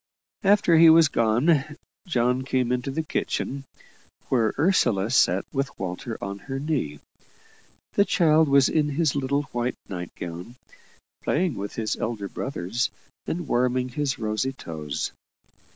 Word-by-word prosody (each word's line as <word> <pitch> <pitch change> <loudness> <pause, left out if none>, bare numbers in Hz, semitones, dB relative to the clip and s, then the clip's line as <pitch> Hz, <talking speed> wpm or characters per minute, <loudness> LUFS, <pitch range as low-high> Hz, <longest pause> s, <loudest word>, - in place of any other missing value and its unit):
After 195 -4 +4
he 165 0 +9
was 160 -1 +7
gone, 140 +7 +2 0.3
John 125 -4 +1
came 130 -2 0
into 125 +2 -1
the 160 +4 -2
kitchen, 140 -2 -3 0.6
where 115 -4 +2
Ursula 120 - +2
sat 130 - +3
with 135 -1 -2
Walter 95 +5 -5
on 100 0 -5
her 135 +6 -5
knee. 135 - -2 0.9
The 200 - +4
child 160 -5 +3
was 140 -1 +5
in 150 -2 +1
his 150 +1 +1
little 140 +1 0
white 120 +1 -1
night 90 -3 -5
gown, 90 +7 -7 0.7
playing 170 +1 0
with 100 -2 -6
his 110 -2 -2
elder 110 -3 -3
brothers, 120 0 -2 0.4
and 175 -1 -3
warming 125 +1 +1
his 140 +1 -2
rosy 110 +4 -1
toes. 75 - -5
130 Hz, 135 wpm, -25 LUFS, 110-150 Hz, 0.9 s, he